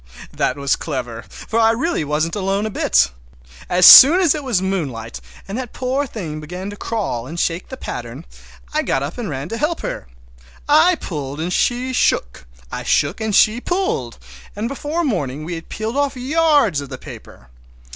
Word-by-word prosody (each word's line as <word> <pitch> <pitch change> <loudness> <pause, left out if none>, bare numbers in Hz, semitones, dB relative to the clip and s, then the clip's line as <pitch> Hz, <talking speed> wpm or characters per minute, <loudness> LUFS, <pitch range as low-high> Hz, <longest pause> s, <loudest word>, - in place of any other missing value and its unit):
That 130 - -1
was 140 -1 +1
clever, 125 -6 -5
for 225 - -4 0.2
really 330 - -1
I - - -3
wasn't 155 +4 -1
alone 195 +1 -1
a 215 - -3
bit! 65 - +2 0.6
As 180 0 +4
soon 310 +8 +11
as 345 -6 +4
it 300 -2 -5
was 245 -8 0
moonlight, 140 - -4 0.3
and 195 - -5
that 250 -3 -7
poor 265 +3 -2
thing 165 -11 -6
began 180 +6 -7
to - - -8
crawl 200 - -3
and 165 +4 -6
shake 170 +2 -2
the 260 - -7
pattern, 120 - -7 0.5
I - - +1
got 135 - -1
up 150 +11 -6
and 230 - -4
ran 135 0 -5
to 230 - -4
help 320 +2 -1
her. - - -5 0.6
I 320 +5 +5
pulled 145 - -6
and 175 +3 -2
she 250 +5 0
shook, - - 0 0.2
I - - -4
shook - - 0
and 220 -2 -1
she 220 +3 +4
pulled, 350 - -2 0.4
and 210 +3 -3
before 295 +6 -3
morning 155 - -2
we 175 - -5
had 165 -1 -8
peeled 220 +3 -4
off 285 -1 0
yards 285 - +2
of 140 - -9
that 130 -2 -8
paper. - - -12
195 Hz, 185 wpm, -19 LUFS, -, 0.6 s, soon